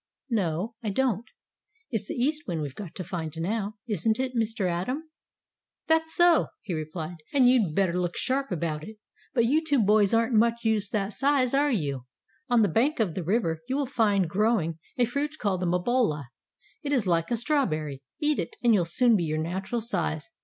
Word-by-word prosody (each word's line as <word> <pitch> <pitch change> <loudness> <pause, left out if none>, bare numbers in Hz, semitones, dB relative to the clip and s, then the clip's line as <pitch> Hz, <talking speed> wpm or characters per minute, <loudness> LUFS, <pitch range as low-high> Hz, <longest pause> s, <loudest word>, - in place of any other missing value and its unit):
"No, 190 0 -1
I 220 - -2
don't. 240 0 0 0.6
It's 215 -3 -2
the - - -4
East 300 +5 -1
Wind 165 -4 -2
we've 140 -3 -5
to 185 -1 -7
find 165 -3 -5
now. 205 +4 -2
Isn't 220 0 +1
it, 260 -1 -2
Mr. 225 -3 0
Atom?" 255 - -3 0.7
"That's 320 0 +2
so," 345 -1 +5 0.2
he 195 - -4
replied. 155 +2 -5 0.2
"And 260 -3 +6
you'd 225 -11 +3
better 190 -3 +2
look 180 -1 -1
sharp 270 0 -1
about 155 -3 -2
it. 215 +5 -10 0.4
But 235 -2 +4
you 300 +7 +2
two 295 -3 +1
boys 210 -2 +4
aren't 230 +2 +2
much 235 +1 +2
use 215 -3 +1
that 205 -1 -1
size, 275 -1 +2
are 285 +2 +3
you? 140 - -2 0.4
On 240 -2 +4
the - - +4
bank 245 - +1
of 205 -7 +1
the 185 - -3
river 165 -3 0
you 260 - 0
will 285 0 0
find 210 -8 +2
growing 185 -4 +1 0.2
a 245 - +4
fruit 290 +5 -3
called 195 -7 -1
the 180 - 0
mabola. 180 - +1 0.5
It 290 -3 -3
is 245 -7 +2
like 170 -2 +1
a 235 - 0
strawberry. 155 - 0 0.2
Eat 300 0 +1
it, - - -4
and 235 -1 +5
you'll 185 -5 +3
soon 235 +7 +3
be 175 -5 +1
your 155 0 -1
natural 190 +9 -2
size. 175 -8 -2
215 Hz, 195 wpm, -27 LUFS, 175-250 Hz, 0.7 s, And